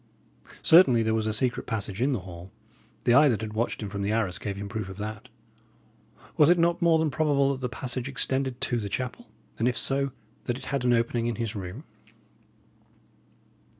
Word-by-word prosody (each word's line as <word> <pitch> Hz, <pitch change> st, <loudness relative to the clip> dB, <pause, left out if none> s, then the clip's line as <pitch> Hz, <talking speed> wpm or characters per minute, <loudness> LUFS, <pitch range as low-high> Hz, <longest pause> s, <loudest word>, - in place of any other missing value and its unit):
Certainly 135 Hz, -9 st, +6 dB
there 110 Hz, 0 st, +1 dB
was 110 Hz, -1 st, 0 dB
a -, -, +1 dB
secret 120 Hz, +3 st, -1 dB
passage 105 Hz, -2 st, -3 dB
in 135 Hz, +3 st, +2 dB
the 125 Hz, -7 st, -1 dB
hall; 90 Hz, 0 st, -10 dB, 0.5 s
the 120 Hz, -, +3 dB
eye 145 Hz, +3 st, +7 dB
that 115 Hz, -4 st, 0 dB
had 110 Hz, -1 st, -5 dB
watched 115 Hz, 0 st, -2 dB
him 105 Hz, -, -4 dB
from 100 Hz, 0 st, -4 dB
the 100 Hz, +1 st, -1 dB
arras 100 Hz, -5 st, -1 dB
gave 100 Hz, -2 st, -4 dB
him 100 Hz, 0 st, -5 dB
proof 105 Hz, -1 st, -5 dB
of 95 Hz, -, -9 dB
that. 105 Hz, +1 st, -6 dB, 1.1 s
Was 150 Hz, 0 st, +6 dB
it 175 Hz, -, +5 dB
not 170 Hz, 0 st, +2 dB
more 170 Hz, -1 st, +4 dB
than 160 Hz, -2 st, 0 dB
probable 140 Hz, -1 st, +2 dB
that 135 Hz, -1 st, -5 dB
the 125 Hz, -, -2 dB
passage 130 Hz, +1 st, -3 dB
extended 130 Hz, -1 st, -1 dB
to 120 Hz, -, 0 dB
the 105 Hz, -2 st, -4 dB
chapel, 130 Hz, -, -4 dB, 0.3 s
and, 115 Hz, -, +2 dB
if 125 Hz, -, 0 dB
so, 140 Hz, 0 st, 0 dB, 0.3 s
that 120 Hz, -, -2 dB
it 135 Hz, -, -9 dB
had 140 Hz, -2 st, -2 dB
an 125 Hz, -1 st, +3 dB
opening 115 Hz, 0 st, 0 dB
in 120 Hz, -, -1 dB
his 115 Hz, -1 st, -3 dB
room? 95 Hz, -, -6 dB
120 Hz, 205 wpm, -27 LUFS, 105-135 Hz, 1.1 s, eye